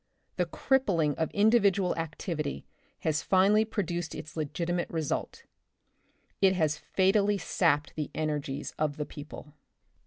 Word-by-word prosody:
The - - +1
crippling 190 - +1
of 160 - 0
individual 200 -3 +3
activity 155 -2 -4 0.4
has 160 -4 0
finally 200 +3 +4
produced 175 -6 -3
its 155 - -8
legitimate 170 +3 -2
result 160 -3 -3 0.5
— - - -41
it 190 -1 +5
has 155 -3 +1
fatally 200 +2 +2
sapped 150 -6 +1
the 150 -2 -3
energies 145 -3 -3
of 150 -1 0
the 150 - -2
people. 150 0 -10
165 Hz, 125 wpm, -29 LUFS, 150-195 Hz, 0.5 s, it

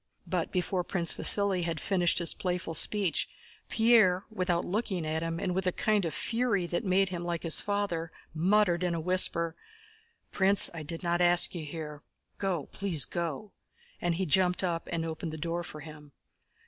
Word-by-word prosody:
But 175 -1 -2
before 180 0 -1
Prince 170 -2 0
Vasíli 200 -3 +3
had 165 -2 -2
finished 180 -2 +1
his 170 -2 +3
playful 180 -2 -3
speech, 195 +1 +1 0.4
Pierre, 220 -5 +4
without 180 -4 -1
looking 190 -4 -2
at 155 +1 -2
him, 165 0 -3
and 180 - -2
with 190 0 -1
a - - +3
kind 210 0 0
of 165 - -3
fury 230 -6 0
that 175 0 -2
made 195 0 +2
him 175 -2 -5
like 170 -1 -3
his 165 -2 +4
father, 200 -5 -2 0.2
muttered 180 +1 +2
in 175 -1 0
a - - -2
whisper: 170 -1 +2 0.8
"Prince, 195 +1 +5
I 165 - -6
did 165 +3 -6
not 175 0 0
ask 175 0 +4
you 170 -3 -5
here. 150 -1 -7 0.4
Go, 185 -6 -1
please 180 -8 -1
go!" 170 +4 -4 0.5
And 175 -1 0
he 190 +2 -1
jumped 180 +3 +2
up 170 -2 -2
and 165 -1 -2
opened 160 0 -5
the - - -5
door 170 +2 -3
for 155 -3 -9
him. 150 -2 -12
175 Hz, 180 wpm, -29 LUFS, 165-190 Hz, 0.8 s, Prince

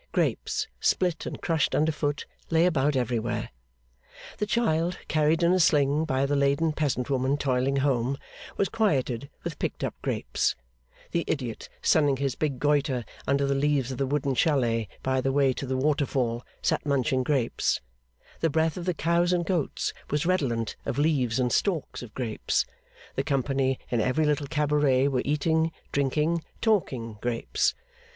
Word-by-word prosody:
Grapes, - - 0
split 180 -3 +1
and - - -5
crushed 165 -3 +1
under 155 +1 +3
foot, 145 -1 -2 0.2
lay 165 +1 +4
about 150 -4 +2
everywhere. 120 -2 -1 0.9
The 210 - 0
child 180 -6 +1
carried 155 +2 +2
in 170 +1 +5
a 185 - +3
sling 150 -1 +3
by 135 -3 +1
the 145 +1 0
laden 140 +3 +2
peasant 140 -4 -1
woman 135 +1 +1
toiling 135 -1 +1
home, 135 -1 +1 0.4
was 200 - +2
quieted 140 - 0
with 170 -4 -5
picked - - -3
up - - -1
grapes; - - 0 0.6
the 170 - 0
idiot 125 -7 -3
sunning 145 -3 +4
his 135 -1 -1
big 145 -2 -2
goitre 145 -4 +1 0.2
under 140 +1 +2
the 140 - +1
leaves 140 -2 +1
of 130 - -5
the 135 - +1
wooden 140 0 0
chalet 120 - +2 0.2
by 130 0 +1
the 135 +1 0
way 135 -1 +3
to 135 - -5
the 130 0 -1
Waterfall, 130 -4 0 0.2
sat - - +1
munching 135 -2 +1
grapes; 130 -3 +1 0.6
the 165 - +2
breath 160 +1 +1
of 175 - -5
the 180 -2 0
cows 170 +2 +2
and 175 -1 +1
goats 175 -6 -1 0.2
was 150 +1 0
redolent 130 - 0
of - - -3
leaves 135 -5 +2
and 125 -1 +1
stalks 175 -8 0
of 120 -3 -9
grapes; 115 -5 0 0.5
the 135 - -1
company 135 -2 0
in 120 -2 +2
every 130 +7 +1
little 150 -1 +1
cabaret 145 -3 +2
were 130 -3 0
eating, 160 +3 +1 0.2
drinking, 150 +4 +1 0.2
talking 130 - 0
grapes. 120 -1 0
140 Hz, 160 wpm, -27 LUFS, 130-160 Hz, 0.9 s, in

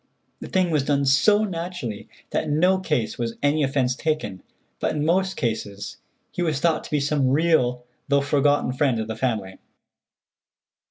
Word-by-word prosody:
The - - -7
thing 185 -3 +1
was 150 -3 +2
done 140 -1 +1
so 205 +11 +4
naturally 170 - -5 0.2
that - - 0
in 150 +1 0
no 185 +2 +4
case 150 -13 -1
was 115 -1 -2
any 145 +2 +2
offence 135 -2 +1
taken, 155 - -2 0.4
but - - -1
in 150 0 -1
most 190 +3 +1
cases 105 -4 -3 0.3
he - - -4
was 155 -5 0
thought 165 0 +1
to - - -9
be 150 - +1
some 140 -2 +1
real 130 -5 +2 0.2
though 140 -1 +3
forgotten 145 -2 +2
friend 130 -3 +1
of 110 - -3
the 110 - -4
family. 110 -6 -2
145 Hz, 170 wpm, -24 LUFS, 125-160 Hz, 0.4 s, so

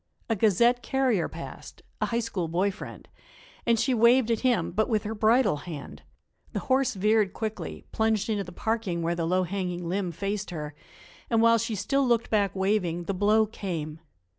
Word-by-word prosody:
A 225 - +2
Gazette 230 +4 +3
carrier 255 -7 +1
passed - - -10 0.2
a - - +2
High 235 0 0
School 195 -7 -3
boy 180 +5 +1
friend - - -10 0.6
and 230 -1 +3
she 255 +3 +2
waved 235 +1 +4
at 225 - +1
him, 240 -10 +1
but 220 +6 0
with 215 -3 +1
her 215 - -3
bridle 220 - +3
hand; 150 -2 -8 0.5
the - - -2
horse 260 -3 +1
veered 210 0 +2
quickly, 220 -1 -5
plunged 220 -1 +1
into 210 -3 -1
the 180 - -10
parking 200 -4 -2
where 170 +1 0
the 170 -1 -2
low 185 +2 +2
hanging 180 -1 -3
limb 185 0 -1
faced 200 +4 -3
her, 150 -4 -5 0.6
and, 230 - +2
while 230 0 +5
she 225 0 -2
still 275 +8 +1
looked 235 -2 +1
back 200 -4 +1
waving, 190 -3 0
the 195 - -2
blow 210 +3 +3
came. 165 -7 -5
210 Hz, 185 wpm, -27 LUFS, 180-230 Hz, 0.6 s, while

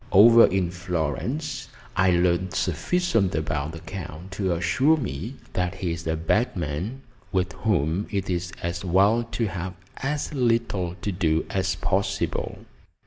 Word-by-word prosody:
Over 115 +4 +8
in 90 -2 0
Florence 90 - -2 0.3
I 95 0 +4
learned 90 0 +2
sufficient 100 - +1
about 80 -1 -2
the 80 - -8
Count 90 -1 -7
to 95 -1 -1
assure 130 - +3
me 110 - -4 0.2
that 90 -1 -1
he 90 -3 -2
is 85 0 -5
a 80 - +1
bad 105 +9 +1
man, 90 - -3 0.3
with 95 0 0
whom 90 -2 0
it 100 -2 -2
is 90 -1 -2
as 85 +1 -2
well 100 +6 +4
to 115 0 -2
have 95 -2 -4 0.2
as 145 +2 -2
little 115 -9 +1
to 105 - 0
do 80 -3 +1
as 95 -1 0
possible. 100 0 -1
95 Hz, 145 wpm, -25 LUFS, 85-110 Hz, 0.3 s, Over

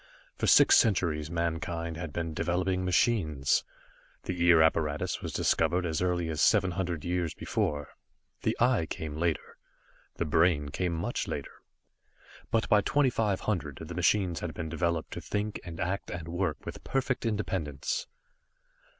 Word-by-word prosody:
For - - -1
six - - +7
centuries 85 -8 +2
mankind 85 0 -2
had 80 -2 -5
been 80 +1 -3
developing 90 +3 0
machines. 85 - +2 0.6
The 90 -1 -2
Ear 85 -2 +7
apparatus 75 -2 0
was - - -4
discovered 90 +1 +1
as 80 -1 -1
early 90 -2 0
as 80 -1 -2
seven 95 -2 +4
hundred 90 -3 -3
years 85 -3 -1
before. 75 -1 -2 0.5
The - - 0
Eye 120 -9 +3
came 80 -2 -5
later, 85 0 -2 0.6
the 85 - -1
Brain 75 -2 +2
came 85 +4 -1
much 80 - -2
later. - - -4 1.0
But 115 - +1
by 105 - +5
2500, 105 - 0
the 80 - -7
machines 90 +1 +2
had 85 - -5
been 85 -3 -4
developed 85 0 -1
to - - -5
think, 105 +1 -3
and 85 -1 -8
act 95 +3 -2
and 85 -2 -6
work 85 -2 -2
with - - -7
perfect 135 -1 -1
independence. 95 - -2
85 Hz, 145 wpm, -29 LUFS, 80-95 Hz, 1.0 s, six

